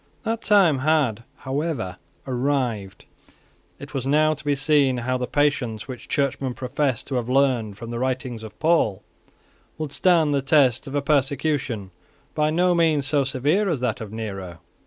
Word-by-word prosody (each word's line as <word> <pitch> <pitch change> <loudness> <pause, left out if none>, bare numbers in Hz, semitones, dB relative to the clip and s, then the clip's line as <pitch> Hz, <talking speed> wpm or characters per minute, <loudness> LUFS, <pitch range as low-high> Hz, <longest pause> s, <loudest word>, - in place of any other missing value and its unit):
That 225 0 -2
time 190 -9 +4
had 130 -6 +1 0.2
however 130 - -2 0.3
arrived. 125 -6 -2 0.7
It - - -11
was 135 -1 -3
now 155 +2 +3
to 155 - -10
be 145 -1 +1
seen 140 -2 +2
how 130 +1 -1
the 125 - -2
patience 135 -7 0
which 130 -3 -8
Churchmen 135 -2 -1
professed 130 -1 -1
to 135 - -4
have 120 0 -3
learned 125 -6 +1
from 115 0 -7
the 120 - -3
writings 130 -2 -2
of 110 -1 -10
Paul 160 - +2 0.7
would 155 -3 -4
stand 165 -3 +3
the 140 - +1
test 135 -2 +3
of 135 - -5
a 145 - 0
persecution 140 -7 0 0.4
by 150 0 +1
no 175 +3 +2
means 160 -5 +2
so 145 0 +2
severe 145 +10 +1
as 155 -6 0
that 120 -2 -1
of 105 -2 -7
Nero. 95 -6 -6
135 Hz, 165 wpm, -23 LUFS, 120-150 Hz, 0.7 s, time